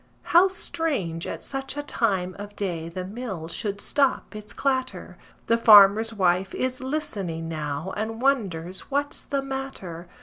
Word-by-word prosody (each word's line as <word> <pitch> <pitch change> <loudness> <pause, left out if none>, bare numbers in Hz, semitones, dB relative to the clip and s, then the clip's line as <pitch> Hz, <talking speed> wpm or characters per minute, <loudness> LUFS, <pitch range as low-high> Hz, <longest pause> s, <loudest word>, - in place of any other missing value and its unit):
How 350 +3 +6
strange 285 - -2
at - - -5
such 270 +1 -5
a 290 - -2
time 190 -10 0
of 205 0 -8
day 170 -5 -3
the 180 +2 -5
mill 195 -5 -5
should 200 +4 -3
stop 275 -2 +1
its 210 -1 -7
clatter! 260 0 -2 0.3
The 230 0 +2
farmer's 215 0 +8
wife 185 -2 +1
is 255 0 -2
listening 200 - -3
now 155 +2 -4
and 220 +2 -3
wonders 190 -10 -1
what's 285 +1 -1
the 275 -1 -2
matter. 265 -11 -6
210 Hz, 145 wpm, -25 LUFS, 180-270 Hz, 0.3 s, farmer's